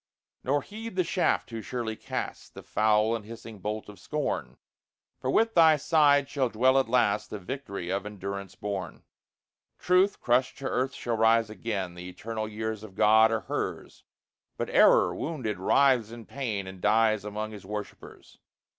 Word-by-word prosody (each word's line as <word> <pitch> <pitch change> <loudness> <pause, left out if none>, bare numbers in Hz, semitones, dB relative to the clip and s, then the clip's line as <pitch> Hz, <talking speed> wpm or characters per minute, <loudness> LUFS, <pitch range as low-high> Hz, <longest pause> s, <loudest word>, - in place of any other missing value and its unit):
Nor 140 +2 +1
heed 220 0 -8
the 185 - +2
shaft 175 +1 0
too 115 -2 -6
surely 115 -2 -4
cast, - - -6
The - - -9
foul 110 +1 +2
and 115 - -5
hissing 115 -1 -10
bolt 105 +3 -4
of 105 -1 -12
scorn; 150 -1 -3 0.6
For - - -3
with 225 0 +2
thy 160 -2 +6
side 145 -2 +3
shall 135 -3 0
dwell, 130 +4 +3
at 130 - -1
last, 110 -4 +2
The 105 - -5
victory 100 -4 -6
of 100 +1 -1
endurance 100 -2 -6
born. 100 -5 -5 0.7
Truth, 185 +2 +2
crushed 125 +2 +1
to 140 - -8
earth, 130 +1 -1
shall 120 -2 -2
rise 115 0 +3
again 100 -5 -4
The 90 +1 -8
eternal 110 +3 -5
years 110 0 -4
of 105 -3 -11
God 110 +2 +5
are 110 -1 0
hers; - - -5 0.5
But - - -3
Error, - - +5
wounded, 125 - -4
writhes 125 +2 +3
in 115 -1 -10
pain, 115 -8 -4
And 95 -1 -10
dies 110 0 +3
among 105 +1 -4
his 105 -3 -10
worshipers. 105 0 -8
110 Hz, 165 wpm, -28 LUFS, 105-130 Hz, 0.7 s, thy